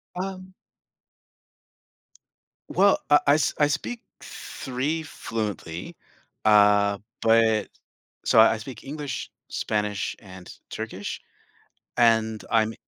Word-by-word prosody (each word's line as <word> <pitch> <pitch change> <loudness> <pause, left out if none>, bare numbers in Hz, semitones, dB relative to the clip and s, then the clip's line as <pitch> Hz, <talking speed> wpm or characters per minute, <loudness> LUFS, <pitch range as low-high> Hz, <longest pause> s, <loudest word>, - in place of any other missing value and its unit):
Um 185 0 -6 2.2
Well, 195 +1 +4
I 145 0 +7
I 145 - +6
s 150 -3 +2
I 150 - +4
speak 190 +10 -3 0.2
3 140 +5 -4
fluently, 105 - -5 0.5
uh, 105 -1 +5 0.2
but 110 -1 +3 0.6
So - - +5
I 110 - +7
I - - -5
speak 110 0 -9
English, 145 -2 -5 0.2
Spanish, 105 -2 -2
and 95 -3 -12 0.2
Turkish, - - -5 0.8
and 110 -2 +3
I'm 110 0 +2
115 Hz, 100 wpm, -25 LUFS, 105-145 Hz, 2.2 s, I